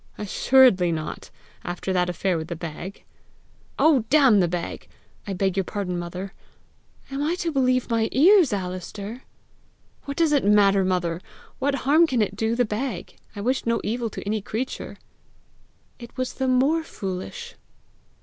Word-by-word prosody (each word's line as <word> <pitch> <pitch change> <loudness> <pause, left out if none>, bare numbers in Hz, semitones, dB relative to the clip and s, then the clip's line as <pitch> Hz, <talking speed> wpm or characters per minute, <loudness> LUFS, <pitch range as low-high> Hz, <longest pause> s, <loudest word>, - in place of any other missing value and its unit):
"Assuredly 210 -3 +4
not, 155 -1 -5 0.3
after 180 +2 -3
that 180 -1 +1
affair 180 +1 -1
with 160 -1 -4
the 170 - -4
bag!" 170 +3 -7 0.7
"Oh, 295 -7 +4
damn 265 -7 +5
the 180 - +3
bag! 175 0 -5 0.4
I 200 - -2
beg 190 0 0
your 195 - +1
pardon, 180 -2 -3
mother." 180 +3 -6 0.8
"Am 275 +1 -3
I 315 +4 0
to 345 -2 -2
believe 255 -3 +1
my 225 -1 +1
ears, 345 - +5
Alister?" 200 +4 -5 0.8
"What 280 0 -5
does 330 -2 +3
it 285 -2 +3
matter, 200 -1 +4
mother? 180 -2 -1 0.4
What 275 +1 +1
harm 315 +5 +5
can 250 -7 +1
it 200 -1 -4
do 220 +2 0
the 245 0 +2
bag? 225 +5 -4 0.2
I 205 - -5
wished 255 +3 -1
no 230 0 +2
evil 230 +2 -2
to - - -8
any 210 +1 -1
creature!" 225 +6 -5 1.0
"It 235 +1 -12
was 255 0 -2
the 265 - -2
more 270 +6 +3
foolish." 220 - -6
215 Hz, 160 wpm, -24 LUFS, 185-265 Hz, 1.0 s, damn